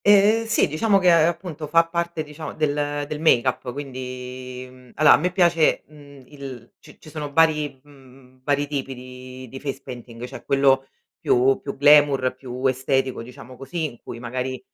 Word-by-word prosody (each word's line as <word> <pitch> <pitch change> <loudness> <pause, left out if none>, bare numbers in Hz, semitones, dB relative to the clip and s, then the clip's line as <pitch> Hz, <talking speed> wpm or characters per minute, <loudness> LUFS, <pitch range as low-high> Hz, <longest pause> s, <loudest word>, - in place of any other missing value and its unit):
Eh 205 +3 +5
sì, 225 - +2
diciamo 195 +7 +2
che 180 -2 +4
appunto 165 -1 +1
fa 165 +3 +4
parte 170 -1 -2
diciamo 150 0 -8
del 145 -1 -1
del 150 0 -5
make-up, 130 -4 +2
quindi, 130 -1 -7
mhmm, 125 -1 -17
allora 155 -1 +7
a - - +6
me 180 +4 -1
piace, 170 -3 +3
mhmm 145 -2 -16
il 130 -4 -10
ci - - -17
ci 155 - -14
sono 150 -2 -5
vari 150 -3 +2
mhmm 130 -2 -19
vari 145 +1 +1
tipi 135 -2 -4
di 130 0 -11
di 135 +3 -9
face 135 -1 -5
painting, 120 -1 -9
c'è - - -10
quello 135 -1 +3 0.3
più 130 +2 +3
più 140 - -6
glamour, 145 -2 +5
più 130 0 -7
estetico, 130 -1 0
diciamo 125 +1 -12
così, 135 +6 -5
in 130 -6 -7
cui - - -8
magari, 125 +2 -4
140 Hz, 170 wpm, -23 LUFS, 130-155 Hz, 0.3 s, allora